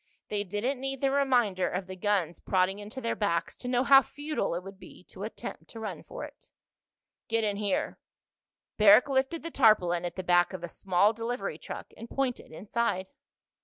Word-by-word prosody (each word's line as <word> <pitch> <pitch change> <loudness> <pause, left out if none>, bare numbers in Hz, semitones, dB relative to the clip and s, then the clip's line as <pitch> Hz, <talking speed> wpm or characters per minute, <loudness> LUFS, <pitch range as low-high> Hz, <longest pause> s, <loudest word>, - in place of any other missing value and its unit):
They 205 -1 -1
didn't 210 +8 -2
need 270 0 -3
the 275 -1 +2
reminder 245 -9 +2
of 185 +1 -3
the 185 0 -8
guns 185 -3 0
prodding 190 +1 +1
into 210 +5 -7
their 230 - -1
backs 170 -5 -1
to 245 - -8
know 250 0 +2
how 270 0 +8
futile 290 - -3
it 175 - -4
would 195 0 -11
be - - -14
to 190 - -11
attempt 220 +3 -7
to 225 - -9
run 220 - -5
for - - -8
it. - - -12 0.8
"Get 225 0 +1
in 205 -2 0
here." 205 -2 -1 0.8
Barrack 210 +4 +7
lifted 270 +4 0
the 335 - -5
tarpaulin 185 - +4
at 175 - -4
the 185 - -4
back 175 +1 +3
of 185 -2 -6
a - - -3
small 190 +4 +2
delivery 230 +3 -4
truck - - -8
and 230 - -10
pointed 270 -3 -2
inside. 200 +1 -2
210 Hz, 190 wpm, -29 LUFS, 185-250 Hz, 0.8 s, how